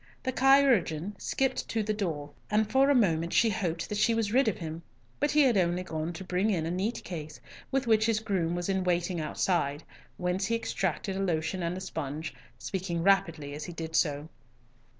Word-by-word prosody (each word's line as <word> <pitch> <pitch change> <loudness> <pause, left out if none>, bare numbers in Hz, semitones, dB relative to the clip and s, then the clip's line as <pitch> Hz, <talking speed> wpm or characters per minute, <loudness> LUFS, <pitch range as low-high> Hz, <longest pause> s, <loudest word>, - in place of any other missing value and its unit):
The 260 - 0
chirurgeon 250 - +3
skipped 265 -1 -1
to 225 -1 0
the 215 +1 -1
door, 160 -8 -3 0.2
and 210 +1 +2
for 270 +4 +4
a 285 - +5
moment 170 -7 +2
she 230 -1 +4
hoped 170 -4 -2
that 210 -1 -3
she 230 - +3
was 220 -2 0
rid 265 0 +4
of 220 - +1
him, 160 0 -6 0.4
but 290 - +2
he 300 +1 +4
had 260 -5 +4
only 180 0 +1
gone 160 -1 -3
to 190 - -7
bring 185 +3 0
in 170 -6 0
a 165 - -2
neat 195 +6 -2
case 155 -4 -7 0.3
with 270 -1 0
which 220 -1 +3
his 225 -2 +2
groom 185 -6 -1
was 175 0 -3
in 190 -1 0
waiting 175 -1 0
outside, 150 -2 0 0.3
whence 180 +2 -1
he 230 - +1
extracted 190 -4 -2
a - - -3
lotion 180 -1 -1
and 175 +2 -3
sponge, 155 -2 -4 0.2
speaking 175 -3 -3
rapidly 165 -7 +2
as 150 +1 -6
he 175 - -7
did 160 -1 -5
so. 145 -2 +1
185 Hz, 200 wpm, -29 LUFS, 165-215 Hz, 0.4 s, a